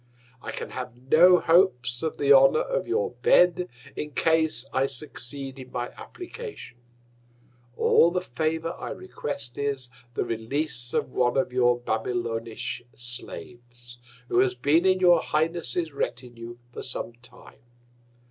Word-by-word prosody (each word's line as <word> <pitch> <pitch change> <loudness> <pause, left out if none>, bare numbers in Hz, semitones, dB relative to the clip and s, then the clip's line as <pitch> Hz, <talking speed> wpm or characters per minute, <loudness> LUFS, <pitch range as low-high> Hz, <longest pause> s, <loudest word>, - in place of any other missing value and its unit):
I - - -7
can - - -6
have 125 -2 -6
no 165 +8 +6
Hopes 160 -9 +3
of 160 -1 -3
the 140 0 +5
Honour 135 0 +6
of - - -2
your 450 +5 0
Bed, 180 - +4 0.3
in 150 - -4
Case 160 -5 +2
I 135 +1 +2
succeed 135 0 -4
in 130 -1 -11
my 120 0 -3
Application: 390 - -10 1.0
All 170 - +5
the 180 +1 0
Favour 160 +2 -2
I - - -5
request, 145 -8 -6
is, 135 -3 -2 0.2
the - - 0
Release 120 +2 -2
of - - 0
one 125 0 +1
of 130 -2 0
your 125 -1 +3
Babylonish 115 0 -3
Slaves, 120 0 -7 0.3
who 120 - +2
has 125 -1 +3
been 150 +8 +3
in 185 0 +4
your 175 -2 +6
Highness's 160 -1 -1
Retinue 120 -3 -5 0.2
for - - -6
some 120 -1 -3
Time. 125 0 -15
135 Hz, 140 wpm, -26 LUFS, 120-165 Hz, 1.0 s, no